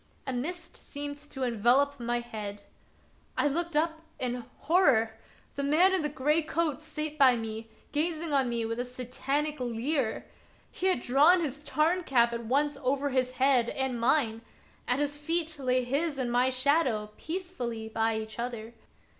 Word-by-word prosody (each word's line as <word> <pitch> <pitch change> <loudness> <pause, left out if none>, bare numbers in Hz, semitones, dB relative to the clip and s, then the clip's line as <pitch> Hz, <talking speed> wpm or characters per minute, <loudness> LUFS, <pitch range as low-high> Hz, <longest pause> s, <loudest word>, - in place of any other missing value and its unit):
A 265 - -3
mist 335 +7 -4
seemed 285 0 -6
to 290 -2 -6
envelop 250 +4 +2
my 240 0 -1
head. 205 -3 -7 0.7
I - - +3
looked 340 +3 -2
up 320 +1 +1 0.2
and 245 -1 -2
— - - -32
horror! 305 -8 +5
of 225 - -4
Peter - - -17
SchlemihL 220 0 -27
71 280 0 -1
the 305 - +3
man 375 +3 +6
in 375 - +2
the 300 - -1
gray 300 +3 +2
coat 310 -2 -1
sate 305 -1 -5
by 260 -3 +7
me, 225 -1 -5 0.2
gazing 315 +1 -1
on 270 -3 +3
me 235 -1 -1
with 230 +1 -3
a - - +1
Satanic 270 +4 -2
leer. 245 +1 -1 0.5
He 375 - -1
had 370 -10 +2
drawn 295 +9 +5
his 290 -3 -2
Tarn 320 +4 +1
cap 235 -5 +3
at 235 0 -4
once 285 +4 +1
over 275 +2 0
his 255 -1 0
head 255 -2 +3
and 265 -3 -1
mine; 235 -3 +2 0.5
at 250 - +2
his 290 0 -1
feet 320 0 -1
lay 255 -1 +1
his 285 +4 -1
and 250 -2 -1
my 250 +2 +3
shadow 255 -5 +1
peaceably 310 -11 -4
by 225 0 0
each 220 +1 -6
other. 235 -1 -4
270 Hz, 180 wpm, -29 LUFS, 240-305 Hz, 0.7 s, by